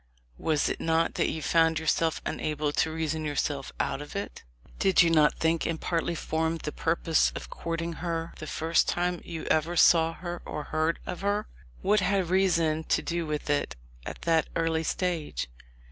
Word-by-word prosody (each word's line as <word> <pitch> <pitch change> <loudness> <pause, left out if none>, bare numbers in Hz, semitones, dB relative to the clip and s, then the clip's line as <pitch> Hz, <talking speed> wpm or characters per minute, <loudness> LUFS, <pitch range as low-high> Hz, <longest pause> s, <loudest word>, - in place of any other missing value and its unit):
Was 155 -2 +1
it - - -3
not 165 0 +2
that - - +1
you 160 - -4
found 165 -1 +3
yourself 160 +1 0
un - - -3
able 150 -1 -1
to 160 +2 +1
reason 160 -1 -2
yourself 145 -2 -2
out 140 - -1
of 145 - -9
it? 200 - -5 0.4
Did 190 -2 +5
you 165 - +3
not 155 -2 +4
think, 165 0 +1
and 165 -1 -2
partly 170 0 -1
form 160 +1 -1
the 150 - -5
purpose, 165 0 +1
of - - -7
courting 165 0 -3
her 165 -1 -3
the 155 - -6
first 160 +2 +1
time 175 0 0
you 165 -2 -6
ever 165 +3 +1
saw 165 0 +6
her 175 0 -6
or 150 - -5
heard 155 +2 0
of 180 - -5
her? 205 +1 0 0.4
What 210 +2 +4
had 185 -2 +1
reason 170 -5 +2
to - - +1
do 170 -1 -2
with 150 -1 -3
it 145 - 0 0.3
at - - -7
that 165 -2 +2
early 165 -1 +1
stage? 170 - -2
165 Hz, 185 wpm, -28 LUFS, 155-170 Hz, 0.4 s, saw